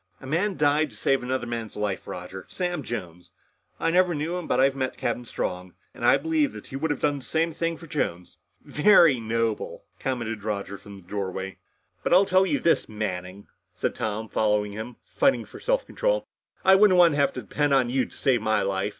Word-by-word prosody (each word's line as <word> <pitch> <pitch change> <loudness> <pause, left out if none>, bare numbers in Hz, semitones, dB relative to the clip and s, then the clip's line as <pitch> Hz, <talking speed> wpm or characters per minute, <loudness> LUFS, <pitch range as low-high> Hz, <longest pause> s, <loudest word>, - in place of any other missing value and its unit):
"A - - -12
man 175 +8 0
died 150 +1 +3
to - - -16
save 135 -1 +2
another 125 0 -2
man's 115 -2 -5
life, 105 -2 -3
Roger. 90 +1 -7
Sam 175 -3 -2
Jones. 90 -8 -7 0.5
I 165 - +1
never 180 -1 +3
knew 155 +4 -2
him. 180 -2 -4
But 125 - +1
I've 135 +1 +4
met 130 -1 -2
Captain 120 - -2
Strong, 90 -5 -4 0.2
and - - -10
I - - +6
believe 315 -3 0
that - - -9
he 135 - -9
would 160 +4 -1
have 145 - -2
done 145 -1 +1
the - - -13
same 165 +3 0
thing 165 +1 -2
for 165 - -12
Jones." 90 - -3 0.3
"Very 155 - +5
noble," 115 -1 -2 0.2
commented 115 -5 -3
Roger 100 -2 -4
from 100 -1 -12
the - - -27
doorway. 95 -1 -4 0.4
"But - - 0
I'll 190 +2 +6
tell 185 0 +3
you 290 - +1
this, 170 - +1
Manning," 100 -2 -5 0.3
said - - -1
Tom, 110 +1 -3
following 105 -2 +1
him, 110 +4 -7
fighting 275 -1 +1
for - - -12
self - - 0
control, - - -1 0.4
"I 190 - +7
wouldn't 190 -1 +6
want 170 -3 +6
to 145 - -1
have 140 -1 +3
to 125 - -5
depend 145 +8 0
on 125 -3 +2
you 130 0 +1
to - - -14
save 130 -5 +2
my 110 0 +1
life. 95 +1 -1
130 Hz, 210 wpm, -25 LUFS, 105-165 Hz, 0.5 s, I